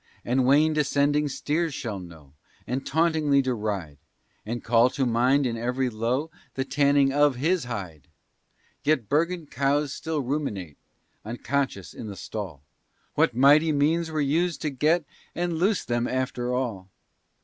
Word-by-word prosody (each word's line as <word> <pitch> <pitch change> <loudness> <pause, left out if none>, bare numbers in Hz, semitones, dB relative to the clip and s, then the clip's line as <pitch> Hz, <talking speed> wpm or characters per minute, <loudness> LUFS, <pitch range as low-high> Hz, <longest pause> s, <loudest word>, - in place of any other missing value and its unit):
And 125 +1 +2
Wayne 150 +4 +5
descending 145 0 +2
steers 150 +2 -1
shall 105 -5 -4
know, 80 -6 -13 0.3
And 130 +2 -3
tauntingly 155 -2 +2
deride; 105 - -2 0.5
And 120 +1 -4
call 115 +2 +4
to 130 +1 -1
mind 125 +4 +3
in 115 -2 -1
every 125 +2 -1
low, 125 +8 -1 0.2
The 130 - -1
tanning 140 -1 +3
of 145 -1 +4
his 160 +4 0
hide. 95 - -6 0.8
Yet 140 -7 +1
Bergen 170 - 0
cows 140 +1 0
still 160 -2 -3
ruminate, 115 - -3 0.4
Unconscious 120 -2 -3
in 110 - -8
the 100 - -7
stall, 95 -9 -6 0.5
What 120 - +2
mighty 145 +5 +5
means 160 +3 +1
were 155 -1 -2
used 165 +5 +1
to 150 - -1
get, 155 +5 +2 0.3
And 175 -2 -1
loose 195 +2 +1
them 120 0 0
after 125 -1 -2
all. 115 -7 -3
135 Hz, 145 wpm, -26 LUFS, 120-150 Hz, 0.8 s, Wayne